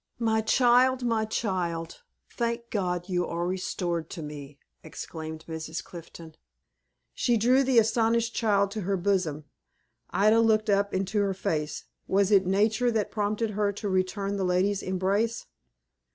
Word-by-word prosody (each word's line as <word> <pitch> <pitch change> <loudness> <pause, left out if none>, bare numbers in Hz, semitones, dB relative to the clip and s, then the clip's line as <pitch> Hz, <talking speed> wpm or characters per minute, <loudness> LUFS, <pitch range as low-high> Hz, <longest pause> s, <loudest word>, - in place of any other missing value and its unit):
"My 220 -1 +1
child, 250 +2 +3
my 225 -2 +1
child! 175 -7 -3 0.3
Thank 235 0 -3
God, 180 -4 -2
you 180 -2 -1
are 170 +1 -2
restored 175 -2 -2
to 165 - -7
me," 145 -1 -9 0.2
exclaimed 160 0 -8
Mrs. 160 0 -5
Clifton. 165 -1 -11 0.8
She 240 -2 +1
drew 250 +5 +4
the 260 -2 +2
astonished 230 +1 +2
child 200 -3 +1
to 215 0 -4
her 195 +1 -1
bosom. 175 -6 0 0.6
Ida 215 +3 +4
looked 215 -1 +3
up 200 0 +2
into 195 +3 -1
her 200 -1 0
face. 150 -4 -2 0.2
Was 200 +1 +2
it 195 -3 +4
Nature 215 +5 +2
that 220 -3 -1
prompted 210 +1 -1
her 205 0 0
to 205 +1 -5
return 195 +1 -1
the 195 - -1
lady's 185 +2 +1
embrace? 195 +5 -1
200 Hz, 145 wpm, -27 LUFS, 180-220 Hz, 0.8 s, drew